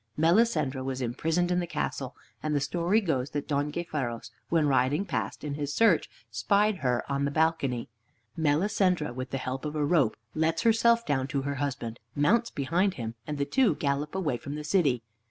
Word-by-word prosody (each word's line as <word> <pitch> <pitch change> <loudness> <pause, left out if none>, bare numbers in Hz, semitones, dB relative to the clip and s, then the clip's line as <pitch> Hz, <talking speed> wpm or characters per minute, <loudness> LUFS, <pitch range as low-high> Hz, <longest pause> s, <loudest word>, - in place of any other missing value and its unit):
Melisendra 160 - +2
was 130 -1 -3
imprisoned 160 +8 0
in 180 - +2
the 175 - -2
castle, 140 -4 -3 0.3
and 155 -1 -1
the - - +3
story 175 +8 +1
goes 140 -8 -1
that 145 -1 -4
Don 145 0 0
Gayferos, 145 -8 -4 0.2
when 160 -3 +3
riding 140 +6 +2
past, - - -3
in 150 -1 -3
his 145 0 -3
search, 220 -8 +4 0.2
spied 200 - +2
her 125 -5 0
on 140 0 -1
the - - +1
balcony. 145 -6 0 0.5
Melisendra, 165 - +1
with 130 +1 -5
the 135 - -2
help 130 0 -4
of 150 0 -4
a 150 -1 +1
rope, 145 -7 +2 0.2
lets 160 +1 0
herself 235 +1 +4
down 135 -2 0
to 135 0 -2
her 140 +1 -2
husband, 125 -5 -3 0.2
mounts 215 +12 +3
behind 175 +8 0
him, 115 -2 -4
and 150 -1 -3
the 140 - 0
two 235 - +3
gallop 145 +3 -1
away 155 -10 0
from 140 +4 -6
the 150 - -5
city. 145 -7 +2
150 Hz, 190 wpm, -28 LUFS, 135-175 Hz, 0.5 s, search